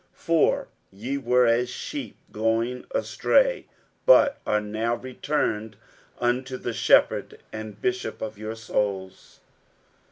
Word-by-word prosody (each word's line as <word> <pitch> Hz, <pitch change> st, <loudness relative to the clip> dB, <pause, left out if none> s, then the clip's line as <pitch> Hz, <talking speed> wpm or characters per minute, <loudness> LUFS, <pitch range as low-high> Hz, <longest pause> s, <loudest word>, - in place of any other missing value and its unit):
60:002:025 -, -, -30 dB
For 165 Hz, -2 st, +2 dB, 0.2 s
ye 120 Hz, +8 st, -4 dB
were 125 Hz, -1 st, +3 dB
as 120 Hz, +1 st, +2 dB
sheep -, -, -6 dB
going 115 Hz, +3 st, -1 dB
astray; -, -, +1 dB, 0.4 s
but 290 Hz, -, +6 dB
are 105 Hz, -, +2 dB
now 110 Hz, +3 st, -1 dB
returned 115 Hz, -4 st, -2 dB, 0.4 s
unto 130 Hz, +2 st, -1 dB
the 120 Hz, -, -4 dB
Shepherd 110 Hz, -, +3 dB, 0.2 s
and 110 Hz, -1 st, -7 dB
Bishop 375 Hz, 0 st, -2 dB
of 110 Hz, 0 st, -5 dB
your 110 Hz, +2 st, -6 dB
souls. 100 Hz, -4 st, -3 dB
115 Hz, 120 wpm, -25 LUFS, 110-130 Hz, 0.4 s, but